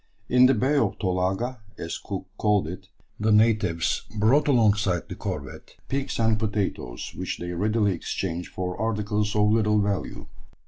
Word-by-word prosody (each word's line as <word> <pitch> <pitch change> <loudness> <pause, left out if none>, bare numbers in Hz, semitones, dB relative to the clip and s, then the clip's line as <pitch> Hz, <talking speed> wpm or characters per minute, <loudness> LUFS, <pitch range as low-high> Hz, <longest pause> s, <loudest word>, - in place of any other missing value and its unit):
In 125 0 +6
the 135 - +4
Bay 135 +6 +2
of - - +1
Tolaga, 95 +6 -1 0.2
as 85 - -5
Cook 95 -2 -6
called 105 -5 +2
it, 95 +3 -8 0.3
the 110 +1 +2
natives 105 -6 +2 0.2
brought 125 +9 +3
alongside 105 - +2
the - - -6
corvette - - -6
pigs 135 0 -2
and 110 -1 +2
potatoes, 100 - -3
which 90 - -4
they 90 0 -5
readily 105 +3 +1
exchanged 85 0 -4
for 90 -1 -3
articles 105 -1 -1
of 105 0 +4
little 105 -1 +3
value. 100 -1 -2
105 Hz, 150 wpm, -25 LUFS, 95-110 Hz, 0.3 s, In